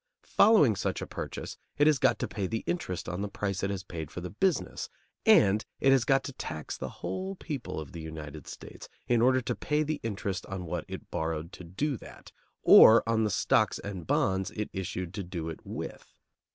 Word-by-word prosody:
Following 180 - +5
such 95 - -2
a - - -4
purchase - - -6 0.2
it 145 - +4
has 150 -3 +4
got - - +3
to - - -2
pay 100 -4 -3
the 110 +3 -3
interest 90 - -3
on 90 +1 -3
the 105 - -2
price 100 -1 -3
it 100 - 0
has 95 -2 -3
paid 80 -5 -6
for - - -7
the 90 0 -6
business, 180 - -1 0.4
and 105 +1 +6 0.2
it 135 - +4
has 130 -3 +4
got 135 +2 +3
to 140 - -6
tax 75 -10 -5
the - - -5
whole 190 +1 -5
people 145 - -5
of 75 -4 -8
the 85 - -7
United 80 -2 -8
States, - - -10 0.2
in 120 -2 +2
order 130 +1 +4
to 115 - -2
pay 150 +1 0
the 155 0 -2
interest 100 -4 -3
on 95 -2 -5
what 80 - -4
it - - -8
borrowed 80 0 -3
to - - -10
do 125 - -2
that, - - -13 0.3
or 115 +1 +9
on 115 -1 +2
the - - +1
stocks 95 - +2
and 95 -6 -7
bonds 95 0 +1
it 105 -1 -3
issued 90 -2 -4
to 100 - -4
do 85 -2 -5
it 80 - -7
with. - - -7
100 Hz, 210 wpm, -29 LUFS, 90-130 Hz, 0.4 s, or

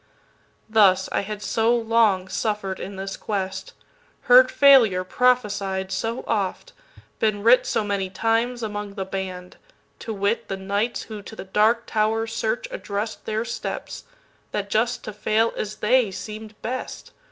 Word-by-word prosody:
Thus, 195 -4 +4
I - - +1
had 210 +1 -6
so 225 +3 +2
long 225 -5 +2
suffer'd, 195 0 -2
in 195 +1 -6
this 195 +1 -5
quest, 190 -2 -4 0.5
Heard 255 +1 +7
failure 255 -9 +6
prophesied 200 -4 0
so 225 +5 -2
oft, 210 - -2 0.5
been 210 -2 0
writSo 230 -2 +4
many 200 -2 -1
times 230 +5 0
among 205 -2 -5
"The 195 -2 -3
Band"—to 190 - -8
wit, 205 +2 -1
The 195 - -4
knights 200 +5 -2
who 215 -2 -8
to 210 +3 -11
the - - -7
Dark 215 +4 +2
Tower's 225 +1 0
search - - -1
address'dTheir 220 - -3
steps—that 230 - -7
just 235 +3 0
to 215 - -6
fail 220 +2 +1
as 210 0 -4
they, 240 0 +2
seem'd 215 +2 -8
best. 255 +3 -5
215 Hz, 135 wpm, -23 LUFS, 195-230 Hz, 0.5 s, Heard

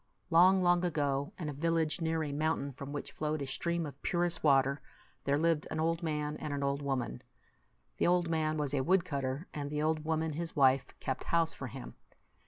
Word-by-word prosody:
Long, 185 +3 +6
long 175 0 +4
ago, 145 -3 0
in 165 - -4
a 150 - -3
village 160 +2 0
near 160 0 0
a 145 - -3
mountain 150 -1 -1
from 140 +2 -8
which 145 -1 -5
flowed 150 +2 -2
a 140 - -3
stream 170 +5 -1
of 140 -2 -9
purest 175 -1 0
water, 140 -1 +3 0.4
there 140 +1 +2
lived 165 -1 +1
an 155 - -3
old 165 +1 +1
man 150 -2 -2
and 150 - -5
an 140 - -2
old 140 +1 0
woman. 130 - -2 0.8
The - - +2
old 175 -1 +3
man 155 -1 0
was 145 -2 -1
a 140 - +2
woodcutter, 140 -3 0
and 145 -1 -4
the 150 0 -1
old 155 0 +1
woman, 160 0 -1
his 165 +2 -4
wife, 135 -2 +4
kept 130 0 -3
house 165 -1 +2
for 135 - -6
him. 125 +1 -8
155 Hz, 200 wpm, -32 LUFS, 140-165 Hz, 0.8 s, Long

